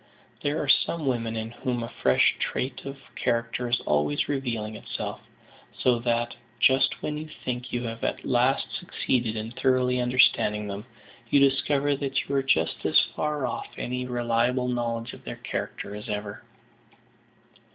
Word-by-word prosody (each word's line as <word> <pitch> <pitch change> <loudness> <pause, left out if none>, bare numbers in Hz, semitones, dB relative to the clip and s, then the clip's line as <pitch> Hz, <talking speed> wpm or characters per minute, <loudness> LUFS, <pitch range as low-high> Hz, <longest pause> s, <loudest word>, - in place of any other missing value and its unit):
There 145 +1 0
are 145 - -2
some 160 +3 +2
women 115 -3 0
in 110 0 -3
whom 120 0 -2
a 115 - -7
fresh 65 -1 +5
trait 130 +1 -2
of 135 0 -5 0.2
character 120 0 0
is 120 - +2
always 75 0 +1
revealing 115 -6 -2
itself, - - -5 0.6
so 125 -2 +3
that, 120 0 0 0.2
just 130 +2 +4
when 150 0 -2
you 155 0 -7 0.2
think 125 0 -3
you 120 0 -1
have 115 -1 -5
at - - -1
last 125 +2 +2
succeeded 120 -10 -1
in 110 +1 -4
thoroughly 125 0 +2
understanding 120 -4 +3
them, 100 +3 -6 0.4
you 140 - +5
discover 140 +1 +3
that 135 -1 -1
you 140 - -3
are 135 - +3
just 105 -12 +1
as - - +5 0.2
far 150 -3 0
off 120 - -3
any 125 +1 -3
reliable 120 +1 +1
knowledge 120 -2 -2
of - - -12
their - - -5
character 100 - -4
as 105 +2 -8
ever. 105 -1 -4
125 Hz, 160 wpm, -27 LUFS, 115-135 Hz, 0.6 s, fresh